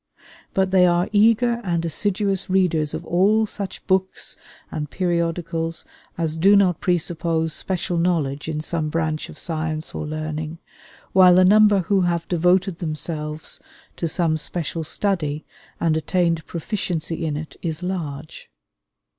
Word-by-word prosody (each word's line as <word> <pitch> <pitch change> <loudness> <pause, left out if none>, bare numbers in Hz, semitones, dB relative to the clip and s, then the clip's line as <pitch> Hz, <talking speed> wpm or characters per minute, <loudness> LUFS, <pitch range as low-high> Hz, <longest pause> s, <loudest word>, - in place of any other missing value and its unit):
But 190 -1 +2
they 185 -1 +6
are 175 0 +2
eager 230 +3 +3
and 170 -2 -1
assiduous 195 +3 0
readers 170 -5 +1
of - - -6
all 205 +6 +3
such 200 -2 -6
books 190 0 0 0.4
and 150 -2 -4
periodicals 170 - -1 0.3
as 160 -1 -1
do 195 +5 +6
not 185 -4 +3
presuppose 165 -2 0
special 180 -2 -2
knowledge 155 -5 0
in 155 -1 -2
some 155 -1 -2
branch 155 -1 -2
of - - -11
science 160 -1 -3
or 155 - -4
learning, 155 +1 -4 0.6
while 185 -1 +7
the 185 0 +6
number 210 0 +6
who 190 +2 +2
have 170 -1 0
devoted 180 +1 +2
themselves 155 -1 -4 0.4
to 170 - -1
some 160 -1 0
special 165 0 -3
study 155 -4 -1 0.3
and 165 -2 +2
attained 165 +1 0
proficiency 170 -2 -3
in 150 -2 -1
it 155 +1 -7
is 165 0 -4
large. 155 -6 -5
170 Hz, 140 wpm, -22 LUFS, 155-185 Hz, 0.6 s, while